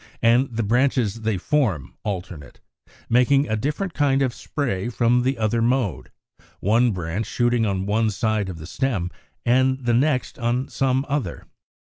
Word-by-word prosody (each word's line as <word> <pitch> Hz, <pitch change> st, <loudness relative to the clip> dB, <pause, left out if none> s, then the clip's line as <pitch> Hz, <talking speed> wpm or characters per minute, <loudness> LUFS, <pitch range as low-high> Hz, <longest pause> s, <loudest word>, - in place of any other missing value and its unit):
73); 115 Hz, -, +6 dB, 0.2 s
and 115 Hz, -, -10 dB
the 115 Hz, -, +1 dB
branches 120 Hz, -1 st, +1 dB
they 110 Hz, -2 st, 0 dB
form 105 Hz, -, 0 dB
alternate, 90 Hz, -7 st, -6 dB, 0.5 s
making 135 Hz, +4 st, +3 dB
a 110 Hz, -, 0 dB
different 150 Hz, -, -2 dB
kind 140 Hz, -2 st, +2 dB
of 130 Hz, -3 st, 0 dB
spray 120 Hz, -9 st, -3 dB
from 120 Hz, +1 st, +2 dB
the 130 Hz, +1 st, 0 dB
other 115 Hz, +1 st, 0 dB
mode, 115 Hz, -, 0 dB, 0.5 s
one 115 Hz, +5 st, +3 dB
branch 90 Hz, +3 st, -3 dB
shooting 120 Hz, -2 st, +1 dB
on 95 Hz, -1 st, -1 dB
one 110 Hz, +2 st, +1 dB
side 105 Hz, 0 st, -1 dB
of 90 Hz, -, -6 dB
the 80 Hz, -, -9 dB
stem 100 Hz, -, -2 dB, 0.3 s
and 130 Hz, +1 st, +2 dB
the 120 Hz, -, +2 dB
next 135 Hz, +3 st, +1 dB
on 120 Hz, +3 st, 0 dB
some 135 Hz, 0 st, 0 dB
other. 140 Hz, -, -3 dB
120 Hz, 160 wpm, -23 LUFS, 105-130 Hz, 0.5 s, 73